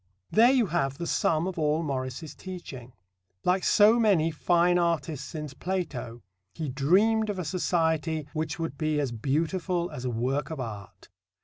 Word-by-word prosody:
There 230 Hz, +3 st, +6 dB
you 255 Hz, -3 st, +4 dB
have 140 Hz, -7 st, -1 dB
the 170 Hz, -, -4 dB
sum 160 Hz, 0 st, +1 dB
of 185 Hz, -2 st, -4 dB
all 155 Hz, +1 st, +1 dB
Morris's 135 Hz, +1 st, -4 dB
teaching. 135 Hz, -10 st, -9 dB, 0.5 s
Like 180 Hz, +1 st, +2 dB
so 215 Hz, +3 st, +5 dB
many 185 Hz, -8 st, +3 dB
fine 175 Hz, +2 st, +2 dB
artists 165 Hz, -4 st, -1 dB
since 150 Hz, -4 st, -6 dB
Plato, 150 Hz, -10 st, -4 dB, 0.3 s
he 155 Hz, -3 st, -3 dB
dreamed 200 Hz, -, +3 dB
of 205 Hz, -, -2 dB
a 180 Hz, -, -3 dB
society 160 Hz, -2 st, 0 dB
which 155 Hz, 0 st, -3 dB
would 165 Hz, -4 st, -4 dB
be 155 Hz, -1 st, 0 dB
as 140 Hz, -4 st, -1 dB
beautiful 165 Hz, -, -1 dB
as 125 Hz, -, -7 dB
a 130 Hz, -, -1 dB
work 130 Hz, +5 st, -1 dB
of 160 Hz, -3 st, -5 dB
art. 105 Hz, -6 st, -8 dB
160 Hz, 165 wpm, -27 LUFS, 140-180 Hz, 0.5 s, There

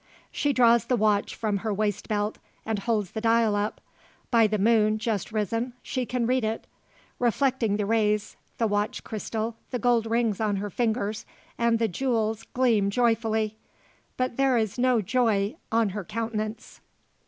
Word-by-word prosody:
She 290 Hz, -, 0 dB
draws 235 Hz, -3 st, +4 dB
the 255 Hz, -, +1 dB
watch 210 Hz, -2 st, +1 dB
from 210 Hz, -3 st, -1 dB
her 215 Hz, +3 st, -3 dB
waistbelt, 205 Hz, +1 st, -1 dB, 0.3 s
and 220 Hz, -2 st, -1 dB
holds 210 Hz, -3 st, -1 dB
the 220 Hz, -, -4 dB
dial 225 Hz, -2 st, +3 dB
up. 205 Hz, +1 st, -2 dB, 0.5 s
By 230 Hz, -3 st, +5 dB
the 215 Hz, 0 st, 0 dB
moon, 215 Hz, 0 st, +3 dB
just 215 Hz, -4 st, -2 dB
risen, 230 Hz, +3 st, -1 dB
she 255 Hz, -2 st, -3 dB
can 245 Hz, -2 st, -1 dB
read 255 Hz, +1 st, +1 dB
it. 220 Hz, +1 st, -2 dB, 0.5 s
Reflecting 245 Hz, -3 st, +1 dB
the 210 Hz, -, -1 dB
rays, 210 Hz, -1 st, +1 dB, 0.2 s
the 230 Hz, -, +1 dB
watch 205 Hz, 0 st, -1 dB
crystal, 220 Hz, +1 st, -4 dB
the 250 Hz, -, -2 dB
gold 235 Hz, -1 st, +2 dB
rings 225 Hz, -2 st, 0 dB
on 210 Hz, -2 st, +1 dB
her 200 Hz, +1 st, -4 dB
fingers, 220 Hz, -1 st, -1 dB, 0.3 s
and 235 Hz, -1 st, +2 dB
the 225 Hz, 0 st, +1 dB
jewels 225 Hz, +1 st, -1 dB
gleam 230 Hz, -6 st, +3 dB
joyfully. 220 Hz, -1 st, +1 dB, 0.6 s
But 255 Hz, -2 st, -1 dB
there 270 Hz, -2 st, +3 dB
is 220 Hz, +1 st, -1 dB
no 250 Hz, -2 st, +3 dB
joy 220 Hz, 0 st, +1 dB, 0.2 s
on 225 Hz, -2 st, +3 dB
her 200 Hz, +1 st, -5 dB
countenance. 220 Hz, +2 st, -4 dB
225 Hz, 160 wpm, -26 LUFS, 210-235 Hz, 0.6 s, By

